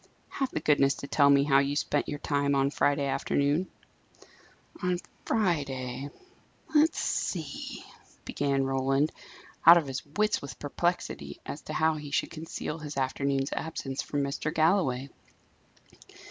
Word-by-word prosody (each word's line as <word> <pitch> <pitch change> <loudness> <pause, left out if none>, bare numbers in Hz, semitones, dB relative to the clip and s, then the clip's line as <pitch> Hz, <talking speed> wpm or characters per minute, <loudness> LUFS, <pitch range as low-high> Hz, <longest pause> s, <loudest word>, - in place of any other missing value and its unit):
Have 270 -2 -2
the - - -3
goodness 140 -2 +3
to 140 - -7
tell 140 -1 +4
me 140 0 +6
how 135 -1 +4
you 140 +1 0
spent 145 0 0
your 145 - -3
time 140 -1 0
on 135 0 +2
Friday 145 -1 +1
afternoon." 145 +5 +1 1.1
"On 180 0 +1 0.3
Friday? 140 - -1 0.6
let's 310 +1 +4
see," 155 -6 -3 0.4
began 140 -1 0
Roland, 135 +2 +1 0.5
out 170 +1 +10
of 165 - +1
his 135 -1 -4
wits 210 +8 0
with 140 -3 -8
perplexity 145 - -2
as 145 - -6
to 155 - -7
how 160 +1 +3
he 150 -1 -7
should 140 - -1
conceal 160 0 -5
his 150 -2 -7
afternoon's 135 +1 0
absence 140 -4 -4
from 145 -1 -2
Mr. 140 +2 -2
Galloway. 155 -6 +2
145 Hz, 140 wpm, -29 LUFS, 135-160 Hz, 1.1 s, out